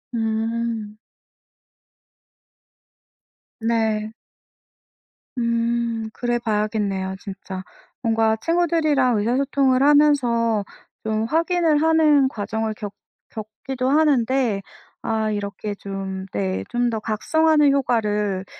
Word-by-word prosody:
음. 225 -1 -2 2.6
네. 220 -1 0 1.3
음 235 -1 0
그래봐야겠네요. 210 -5 -1
진짜. 190 -1 -7 0.4
뭔가 225 -2 +2
친구들이랑 310 -6 +2
의사소통을 260 +3 +2
하면서 245 -7 +3 0.4
좀 220 0 -1
확인을 325 +2 +2
하는 310 -4 +4
과정을 220 -1 -3
겪 205 -1 -7 0.4
겪기도 255 +4 -4
하는데 265 -7 +2 0.4
아 220 -1 -1
이렇게 205 0 -4
좀 195 -1 -5
네. 95 -1 -2
좀 240 0 +1
더 225 -2 -2
각성하는 300 +7 +3
효과를 210 -7 0
230 Hz, 185 characters per minute, -22 LUFS, 210-270 Hz, 2.6 s, 하는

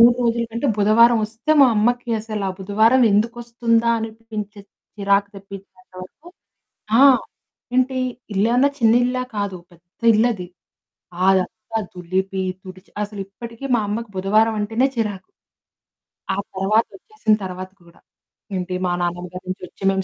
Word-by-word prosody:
3 240 +1 +8
రోజులకంటే 235 +2 -1
బుధవారం 225 +3 +5
వస్తే 225 +7 -1
మా - - +8
అమ్మకి 240 +3 +1
అసలా 215 -2 -4
బుధవారం 220 +6 +3
ఎందుకొస్తుందా 235 +1 +1
అనిపించేంత, 220 -2 -7 0.3
చిరాకు 200 0 +2
తెప్పించేంత 195 -1 -13
వరకు 300 - -14 0.7
ఆ! - - +8 0.7
ఏంటి 255 +1 +2 0.4
ఇల్లేమన్నా, 235 +7 +3
చిన్న 225 -1 +4
ఇల్లా? 255 0 -1
కాదు. 200 -3 -2
పెద్ద 175 +4 -25
ఇల్లది! 215 -5 +1 0.8
అదంతా 215 +4 0
దులిపి, 190 +2 -2 0.2
తుడిచి 185 0 -13
అసలిప్పటికి 210 +5 -8
మా 225 - +1
అమ్మకు 225 +2 -3
బుధవారం 215 +4 +2
అంటేనే 225 +5 +1
చిరాకు. 210 -5 -2 1.1
ఆ - - -6 0.2
తర్వాత 210 +4 +2
ఒచ్చేసిన 430 - -1
తర్వాత 185 0 -6
కూడా. 170 0 -20 0.6
ఏంటి 180 0 -3
మా 180 - 0
నాన్నమ్మ 175 +1 -2
గారి 180 - -7
నుంచి 185 0 -5
ఒచ్చి, - - -16
మేము 190 0 -1
210 Hz, 125 wpm, -21 LUFS, 190-230 Hz, 1.1 s, 3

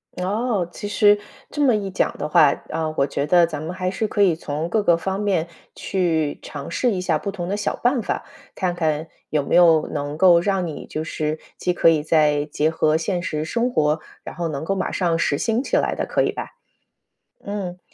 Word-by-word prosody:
哦， 200 0 -1
其 205 - -6
实 205 0 +4 0.3
这 295 - -2
么 255 -5 +4
一 200 -2 -3
讲 190 - 0
的 - - -3
话 150 -1 +5 0.2
嗯， 160 0 -2
我 135 - +3
觉 140 +1 -2
得 175 +2 +5
咱 155 -3 -5
们 165 +3 -5
还 185 0 -2
是 215 +3 -1
可 205 - -1
以 180 -4 +4
从 155 0 -4
各 215 +3 +1
个 170 -4 +3
方 190 +3 -3
面 195 -6 0 0.3
去 160 -6 -1
尝 140 -2 -8
试 245 - +1
一 190 - -1
下 170 -4 +1
不 200 - -4
同 185 -3 -5
的 200 - -1
小 210 - -1
办 245 0 +1
法， - - -3 0.3
看 180 -2 -1
看 160 -2 -1 0.2
有 150 -2 0
没 - - 0
有 165 -3 +6
能 145 0 -4
够 175 -1 +6
让 190 0 0
你 160 -3 -7
就 155 - -4
是 155 0 -3 0.2
既 180 - 0
可 165 - +4
以 160 -2 +3
再 150 -1 +2
结 150 +1 0
合 155 -1 +2
现 175 +2 -2
实 155 -2 -3
生 235 +8 0
活， 155 -8 +1 0.2
然 - - -8
后 170 -1 -2
能 145 -2 -4
够 195 - 0
马 190 - -2
上 170 -3 0
实 145 - +1
行 225 - 0
起 - - 0
来 - - +1
的， - - -2
可 - - +1
以 - - +1
吧？ - - -6 1.0
嗯 195 -3 -5
175 Hz, 240 characters per minute, -22 LUFS, 155-195 Hz, 1.0 s, 有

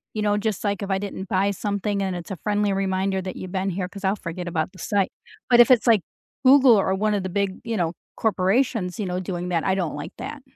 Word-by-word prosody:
you 215 - -1
know, 205 0 +2
just, 215 -1 -2
like, 200 0 -1
if 200 - -4
I 190 - +1
didn't 195 -1 -6
buy 200 0 +2
something 205 0 -2
and 190 -2 -2
it's 175 +2 -7
a - - -2
friendly 205 -1 +1
reminder 190 0 0
that 185 0 -6
you've 185 -1 -7
been 195 +1 -1
here, 180 0 -2
'cause 200 +1 -11
I'll 195 +2 +2
forget 175 +1 -5
about 165 +1 -1
the 185 - -15
site. 200 0 0 0.4
But 240 -1 +6
if 240 - +8
it's 245 0 +4
like 220 -5 +5 0.4
Google 265 -2 +7
or 190 -1 +1
one 210 +2 +1
of 200 -2 -1
the 185 - -3
big, 195 -1 -1
you 230 -2 -2
know, 170 -1 0 0.2
corporations, 205 -1 +1
you 205 - -1
know, 180 0 -2
doing 180 -1 -4
that, 165 -2 0
I 190 - +2
don't 175 -6 -2
like 145 - -7
that. 300 -2 -7
195 Hz, 255 wpm, -24 LUFS, 185-210 Hz, 0.4 s, if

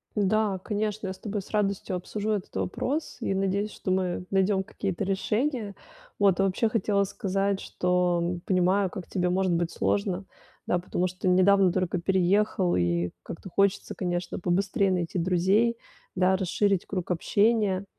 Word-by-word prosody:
Да, 210 0 +1
конечно, 210 +1 -2
я 190 - -3
с 190 - -16
тобой 210 -1 -3
с - - -15
радостью 200 -3 -1
обсужу 210 +4 -3
этот 200 -3 -3
вопрос 260 - -2
и 195 - 0
надеюсь, 195 +2 0
что 185 - -4
мы 180 -1 -1
найдем 195 0 +2
какие-то 195 0 -3
решения. 210 +3 -1 0.5
Вот, 195 -3 +4
и 195 - +4
вообще 195 +4 +1
хотела 205 -2 +1
сказать, 195 0 -1
что 180 -1 0
понимаю, 185 +1 +2
как 180 -2 -8
тебе 180 -1 0
может 185 -1 +1
быть 170 0 0
сложно, 195 -2 -1 0.4
да, 180 - +2
потому 180 0 -1
что 185 +1 -2
недавно 185 0 +5
только 185 0 0
переехал, 190 +1 +2
и 85 0 0
как-то 190 - -8
хочется, 200 +2 +1
конечно, 175 -1 -3
побыстрее 190 +2 +1
найти 180 -1 -1
друзей, 190 +7 +2 0.4
да, 185 +1 +3
расширить 195 0 +1
круг 185 -3 -4
общения. 200 +2 +2
190 Hz, 155 wpm, -27 LUFS, 180-205 Hz, 0.5 s, недавно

